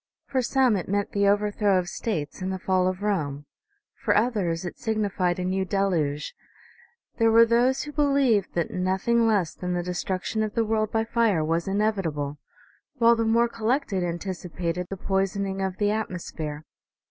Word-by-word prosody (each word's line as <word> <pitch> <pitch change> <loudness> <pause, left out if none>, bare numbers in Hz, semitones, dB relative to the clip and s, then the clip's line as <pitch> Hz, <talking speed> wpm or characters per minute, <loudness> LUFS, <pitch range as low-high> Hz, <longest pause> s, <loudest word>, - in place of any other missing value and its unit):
For 265 -2 0
some 255 -1 +3
it 185 - -3
meant 200 +1 0
the 200 0 +2
overthrow 205 -1 +2
of 180 -1 -1
states 175 -6 -4
and 185 +1 -2
the 190 - -2
fall 185 0 +1
of 185 +2 -3
Rome; 145 -9 -1 0.6
for - - +3
others 200 -7 0
it 175 - -7
signified 200 -5 0
a 180 - -2
new 190 +1 0
deluge; 175 -7 -1 0.9
there 225 0 +5
were 230 +1 +7
those 245 +3 +2
who 295 - -7
believed 275 -9 +2
that 170 -2 -1
nothing 190 +6 +1
less 200 -7 +1
than 180 0 -3
the 175 - -1
destruction 185 +4 -2
of 215 -1 -2
the 230 - +2
world 215 -1 0
by 225 0 +1
fire 225 -8 +1
was 165 +2 0
inevitable; 190 -9 -1 0.6
while 235 -2 +5
the 230 0 0
more 230 +1 +3
collected 230 -4 -1
anticipated 175 0 -3
the 195 - -5
poisoning 195 0 -1
of 190 -1 -2
the 205 -1 +1
atmosphere. 170 -7 -4
195 Hz, 170 wpm, -25 LUFS, 180-225 Hz, 0.9 s, were